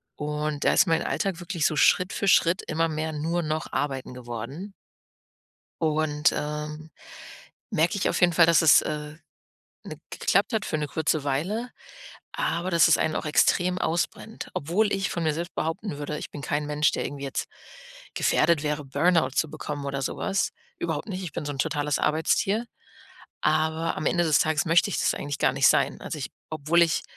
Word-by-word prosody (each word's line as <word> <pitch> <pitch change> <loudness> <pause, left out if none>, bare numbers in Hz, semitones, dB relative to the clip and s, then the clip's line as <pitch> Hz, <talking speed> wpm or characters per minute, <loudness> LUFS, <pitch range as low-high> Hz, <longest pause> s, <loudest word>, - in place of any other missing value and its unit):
Und 150 0 -3
da - - +4
ist - - +4
mein 165 0 +2
Alltag 190 -3 -2
wirklich 175 -3 -2
so 155 - +2
Schritt 180 +5 +3
für 200 - -2
Schritt 170 0 +4
immer 165 +1 +1
mehr 155 0 -3
nur 165 +3 -1
noch 155 +1 -3
arbeiten 135 -3 -2
geworden. 125 - -7 1.1
Und, 155 -1 +2
ähm, 150 +1 -5 0.8
merke 165 +5 +1
ich 200 - +1
auf - - -1
jeden 175 -1 +5
Fall, 165 0 +6
dass 170 0 +5
es, 160 - +7
äh, 150 0 -5 0.7
ne - - -8
geklappt - - +1
hat 220 -3 0
für 155 - -1
'ne 150 -1 -2
kurze 155 +1 0
Weile, 185 - -2 0.6
aber 170 +3 -1
dass 170 0 +5
es 160 - +6
einen 155 - 0
auch - - -3
extrem 180 +4 +2
ausbrennt. 175 +7 -3
Obwohl 195 +8 +1
ich 195 -1 -1
von 170 - -3
mir 155 -2 +1
selbst 170 +3 -5
behaupten 165 0 -3
würde, 150 +1 -4
ich - - -7
bin 145 - -8
kein 145 +1 -2
Mensch, 150 0 +2
der - - -2
irgendwie 140 -1 -5
jetzt 135 - -3 0.7
gefährdet 165 -3 +2
wäre, 150 0 -2
Burnout 145 +1 +2
zu 150 +3 0
bekommen 145 -1 -5
oder 140 0 -3
so - - -3
was. 195 0 0 0.3
Überhaupt 165 +4 -3
nicht, 190 -2 -4
ich 175 - -6
bin - - -4
so 145 - -3
'n 135 - -8
totales 145 +1 0
Arbeitstier. 195 +8 +1 0.8
Aber 160 +1 +1
am 150 - -3
Ende 175 0 +2
des 155 -3 +4
Tages 155 0 +1
möchte 165 +2 +4
ich - - -2
das - - +1
eigentlich 145 0 -4
gar - - +2
nicht - - +4
sein. - - +2
Also, - - -5
ich - - -5 0.2
obwohl 155 +2 +2
ich 165 -1 +1
155 Hz, 190 wpm, -26 LUFS, 150-170 Hz, 1.1 s, es